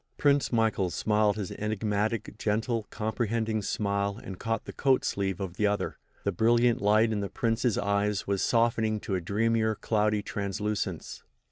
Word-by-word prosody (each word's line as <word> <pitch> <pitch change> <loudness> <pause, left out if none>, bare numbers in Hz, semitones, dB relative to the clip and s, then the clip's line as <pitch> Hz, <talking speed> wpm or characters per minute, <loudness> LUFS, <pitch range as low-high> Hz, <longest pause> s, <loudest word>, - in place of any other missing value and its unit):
Prince 145 -1 +3
Michael 110 -5 +2
smiled 105 +2 +2
his 105 -4 -4
enigmatic, 105 +1 -2
gentle, 110 +1 -1
comprehending 110 0 -1
smile 100 0 -1
and 95 -2 -8
caught 115 -1 -2
the - - -7
coat 135 -2 +2
sleeve 95 -2 -1
of 95 -2 -5
the 105 - +3
other. 105 0 -2 0.2
The 100 - +1
brilliant 120 +4 +3
light 110 +2 +4
in 105 - 0
the 100 -1 -3
Prince's 115 -1 0
eyes 100 0 0
was 100 -1 0
softening 115 -2 +2
to - - -4
a 95 - 0
dreamier, 110 +4 +1
cloudy 105 -1 +1
translucence. 105 +1 -3
105 Hz, 155 wpm, -28 LUFS, 100-115 Hz, 0.2 s, light